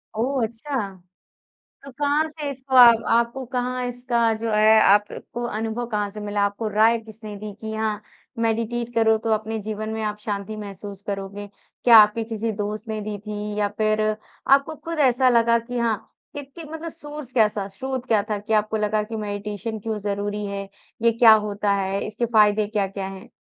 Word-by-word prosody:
ओह 255 +3 0
अच्छा। 240 +5 -3 1.1
तो 275 - -9
कहाँ 295 +2 +2
से 300 -2 -6
इसको 265 0 -6
आप 235 -2 +8
आपको 235 +3 0
कहाँ 250 0 -2
इसका 240 -2 0
जो 225 +1 -3
है 215 +1 +6
अ, - - +6
आपको 205 +4 +1
अनुभव 225 +2 -3
कहाँ 210 -3 -1
से 210 +1 -9
मिला, 205 0 -1
आपको 205 +2 -2
राय 220 +3 +4
किसने 215 -1 -10
दी? 210 0 -7
की 220 0 -5
हाँ, 215 -1 -2 0.4
मेडिटेट 230 +1 -1
करो 220 -1 +4
तो 225 +1 -3
अपने 220 +1 -1
जीवन 215 0 -4
में 220 - -3
आप 210 0 -3
शांति 210 0 -4
महसूस 200 -1 -8
करोगे। 200 0 -5 0.4
क्या 235 -2 +9
आपके 215 +2 +5
किसी 225 0 -3
दोस्त 215 +2 -5
ने 215 -1 -3
दी 210 0 -4
थी 210 0 -4
या 205 -1 +2
फिर 215 0 +2 0.5
आपको 280 +3 +4
खुद 330 +1 -6
ऐसा 255 -2 +4
लगा 235 -1 +4
कि 245 +2 -5
हाँ, 230 -2 +1 0.4
कि, 290 - -4
कि 315 +4 -11
मतलब 325 +1 -5
सोर्स 295 -5 -9
कैसा 210 -4 +2
स्रोत 260 +5 -5
क्या 215 -4 +3
था 210 - 0
कि 215 +2 -5
आपको 215 +1 +1
लगा 210 0 0
कि 225 +1 -6
मेडिटेशन 210 +1 -4
क्यों 220 +1 -3
ज़रूरी 205 +1 -3
है, 200 0 -5 0.3
ये 230 0 +4
क्या 230 -1 +7 0.2
होता 205 0 0
है? 195 0 -1
इसके 225 +3 -2
फायदे 210 -2 +4
क्या-क्या 195 -2 -2
हैं? 190 -1 -10
220 Hz, 185 wpm, -23 LUFS, 210-240 Hz, 1.1 s, क्या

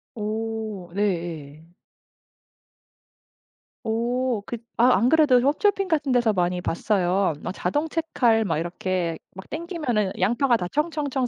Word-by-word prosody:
어 215 -3 -4
네예. 165 -7 -3 2.2
오 235 +1 0
그 235 - -3 0.2
아 250 -5 +6
안 235 +5 +3
그래도 300 -5 +5
홈쇼핑 385 - +2
같은 295 -5 0
데서 240 -3 +3
많이 180 -1 0
봤어요. 185 0 +1
막 - - -3
자동 295 +8 -1
채칼 250 -9 +1
막 165 -6 -1
이렇게 175 0 -2 0.2
막 190 - -10
땡기면은 300 - -1
양파가 240 +1 +3
다 180 - -3
청청청 295 -4 -1
225 Hz, 230 characters per minute, -24 LUFS, 185-275 Hz, 2.2 s, 아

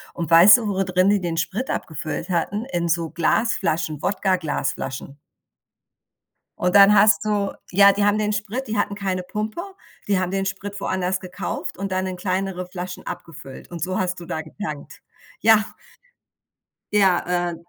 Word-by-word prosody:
Und 170 -2 -4
weißt 175 +7 +9
du, 225 - -4
wo 195 -1 0
drin 185 +1 +2
die 205 0 +3
den 170 -2 -3
Sprit 200 +10 -2
abgefüllt 155 +3 -4
hatten? 185 +5 -1
In 170 -1 0
so 165 0 0
Glasflaschen, 165 -5 0
Wodka 195 -2 +1
Glasflaschen. 140 -4 -4 1.4
Und 180 +2 +2
dann 200 +1 +8
hast 210 +1 +5
du 205 -2 0 0.2
ja, 200 +1 +7
die 200 +1 0
haben 205 +1 +3
den 210 0 0
Sprit 215 +6 -3
die 215 -1 -2
hatten 205 - 0
keine 190 -2 -2
Pumpe, 215 - -4 0.5
die 200 -2 +2
haben 185 -1 -2
den 195 0 -1
Sprit 200 +1 -5
woanders 185 -1 -1
gekauft 185 0 -5
und 195 0 -4
dann 185 0 0
in 185 -1 -4
kleinere 185 0 -2
Flaschen 180 0 -7
abgefüllt. 145 -5 -9
Und 170 -3 -7
so 185 +2 -1
hast 185 -1 -2
du 170 - -9
da 160 - -4
getankt, 155 -3 -8 0.4
ja. 220 -1 +5 1.3
Ja, 180 -3 +2
äh, - - -5
185 Hz, 165 wpm, -22 LUFS, 175-205 Hz, 1.4 s, weißt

